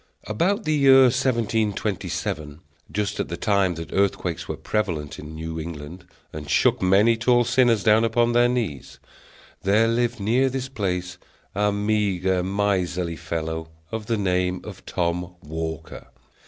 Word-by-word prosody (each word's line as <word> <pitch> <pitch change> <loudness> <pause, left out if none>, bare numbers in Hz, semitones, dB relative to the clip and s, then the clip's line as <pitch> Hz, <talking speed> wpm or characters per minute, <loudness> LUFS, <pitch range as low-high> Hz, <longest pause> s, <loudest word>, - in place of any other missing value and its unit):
About 185 - 0
the 155 - 0
year 135 -2 +7
1727, 110 - -1 0.3
just 105 0 -2
at - - -1
the 85 - -5
time 100 -4 +1
that 80 0 -7
earthquakes 95 -4 0
were - - -4
prevalent 85 -9 -2
in 75 +1 -9
New 80 +1 -5
England, 80 +2 -8 0.3
and 75 -1 -7
shook - - +3
many 100 +5 +4
tall 120 +1 +3
sinners 120 -3 +3
down 110 +1 +5
upon 120 +1 +2
their 120 0 +4
knees, 110 - -3 0.6
there 105 +4 +3
lived 120 0 0
near 120 +7 +2
this 130 0 -4
place 90 -7 -3 0.3
a 105 +1 +1
meagre, 100 -3 0
miserly 90 -3 -1
fellow, 80 0 -4 0.2
of 110 -1 -5
the 115 - 0
name 90 -2 0
of 100 -3 -10
Tom 90 0 -2
Walker. 80 +1 -6
100 Hz, 140 wpm, -24 LUFS, 85-115 Hz, 0.6 s, year